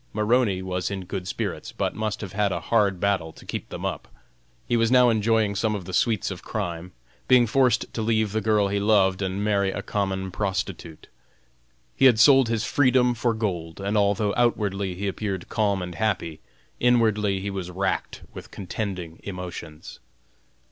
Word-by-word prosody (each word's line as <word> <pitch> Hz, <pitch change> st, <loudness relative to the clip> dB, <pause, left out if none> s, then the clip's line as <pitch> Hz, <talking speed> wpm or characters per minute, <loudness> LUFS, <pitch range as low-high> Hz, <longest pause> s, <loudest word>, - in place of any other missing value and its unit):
Maroney 105 Hz, -3 st, +1 dB
was 90 Hz, -1 st, -2 dB
in 95 Hz, -2 st, -5 dB
good 90 Hz, 0 st, -5 dB
spirits, -, -, -4 dB
but -, -, -2 dB
must 110 Hz, -1 st, -3 dB
have 95 Hz, -3 st, -7 dB
had 100 Hz, -1 st, +1 dB
a -, -, -1 dB
hard 100 Hz, -5 st, +1 dB
battle 95 Hz, -5 st, 0 dB
to -, -, -15 dB
keep -, -, -5 dB
them -, -, -6 dB
up. -, -, -4 dB, 0.6 s
He 120 Hz, -, 0 dB
was 115 Hz, -1 st, +2 dB
now 125 Hz, -1 st, +5 dB
enjoying 110 Hz, -1 st, +2 dB
some 105 Hz, +2 st, 0 dB
of 95 Hz, -4 st, -6 dB
the 95 Hz, -, -8 dB
sweets 110 Hz, 0 st, +1 dB
of 90 Hz, -, -7 dB
crime, 90 Hz, -4 st, -4 dB, 0.4 s
being 125 Hz, -1 st, +6 dB
forced 125 Hz, +2 st, +1 dB
to 115 Hz, -, -3 dB
leave 110 Hz, -2 st, +1 dB
the 110 Hz, +1 st, -1 dB
girl 105 Hz, -1 st, +2 dB
he 100 Hz, +1 st, 0 dB
loved 100 Hz, -2 st, +3 dB
and 95 Hz, +1 st, -2 dB
marry 100 Hz, -2 st, +1 dB
a -, -, -4 dB
common 95 Hz, -2 st, -2 dB
prostitute. 95 Hz, -5 st, -4 dB, 0.9 s
He 135 Hz, -, +3 dB
had 120 Hz, -4 st, +6 dB
sold 135 Hz, 0 st, +6 dB
his 115 Hz, -1 st, 0 dB
freedom 125 Hz, -3 st, +3 dB
for 120 Hz, -1 st, 0 dB
gold, 90 Hz, -7 st, -3 dB
and 100 Hz, +2 st, -2 dB
although 100 Hz, 0 st, +2 dB
outwardly 100 Hz, -6 st, 0 dB
he 100 Hz, +3 st, -3 dB
appeared 95 Hz, -2 st, -4 dB
calm 100 Hz, -4 st, 0 dB
and 90 Hz, 0 st, -6 dB
happy, 85 Hz, -7 st, -2 dB, 0.4 s
inwardly 110 Hz, -5 st, +2 dB
he 100 Hz, +1 st, -4 dB
was 95 Hz, -2 st, -5 dB
racked 95 Hz, +2 st, -3 dB
with -, -, -10 dB
contending 90 Hz, -4 st, -5 dB
emotions. 90 Hz, -5 st, -8 dB
100 Hz, 175 wpm, -25 LUFS, 95-110 Hz, 0.9 s, being